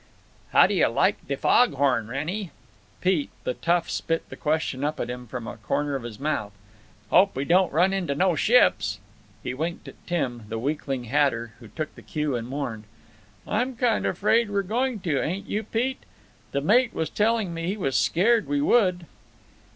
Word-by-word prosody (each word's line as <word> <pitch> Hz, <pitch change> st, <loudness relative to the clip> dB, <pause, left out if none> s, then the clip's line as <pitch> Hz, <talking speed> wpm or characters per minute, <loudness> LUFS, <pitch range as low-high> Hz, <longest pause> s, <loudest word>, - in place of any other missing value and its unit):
"How -, -, +7 dB
do -, -, 0 dB
yuh -, -, +4 dB
like -, -, +1 dB
de -, -, -1 dB
fog 245 Hz, -10 st, +4 dB
horn, 130 Hz, -5 st, +1 dB
Wrennie?" 165 Hz, -, -3 dB, 0.5 s
Pete, 180 Hz, -6 st, +1 dB
the -, -, -1 dB
tough, 170 Hz, +5 st, 0 dB
spit 165 Hz, 0 st, -2 dB
the -, -, -8 dB
question 150 Hz, -3 st, -1 dB
up 150 Hz, +1 st, -1 dB
at -, -, -2 dB
him 125 Hz, 0 st, -7 dB
from 120 Hz, 0 st, -6 dB
a -, -, -7 dB
corner 145 Hz, +6 st, -1 dB
of 135 Hz, -, -3 dB
his 115 Hz, -2 st, -8 dB
mouth. 135 Hz, -8 st, -2 dB, 0.6 s
"Hope 195 Hz, +2 st, +5 dB
we 135 Hz, -, -2 dB
don't 180 Hz, +2 st, +3 dB
run 180 Hz, +6 st, +3 dB
into 175 Hz, -7 st, -1 dB
no 180 Hz, +2 st, +2 dB
ships." 155 Hz, -, +3 dB, 0.5 s
He -, -, -3 dB
winked 165 Hz, +6 st, -4 dB
at -, -, -14 dB
Tim, 125 Hz, -10 st, -2 dB
the 115 Hz, -, -3 dB
weakling 135 Hz, 0 st, -2 dB
hatter, 120 Hz, -3 st, 0 dB
who 115 Hz, -, -12 dB
took 155 Hz, +8 st, -5 dB
the -, -, -13 dB
cue 150 Hz, -3 st, -2 dB
and 115 Hz, -1 st, -4 dB
mourned: 125 Hz, -5 st, -4 dB, 0.6 s
"I'm 245 Hz, +4 st, -1 dB
kinda 235 Hz, -2 st, +1 dB
afraid 215 Hz, +5 st, +2 dB
we're 200 Hz, -1 st, 0 dB
going 235 Hz, +2 st, -1 dB
to, 155 Hz, -7 st, 0 dB
ain't 190 Hz, +5 st, -3 dB
you, 210 Hz, -, -1 dB
Pete? 240 Hz, +5 st, -2 dB, 0.5 s
The 140 Hz, -, -1 dB
mate 235 Hz, -, +3 dB
was 160 Hz, -, -2 dB
telling 215 Hz, -4 st, +1 dB
me 165 Hz, 0 st, -4 dB
he 195 Hz, +3 st, -1 dB
was 135 Hz, -10 st, -1 dB
scared 220 Hz, +6 st, +3 dB
we 290 Hz, -, 0 dB
would." 190 Hz, -, +3 dB
165 Hz, 190 wpm, -25 LUFS, 135-205 Hz, 0.6 s, How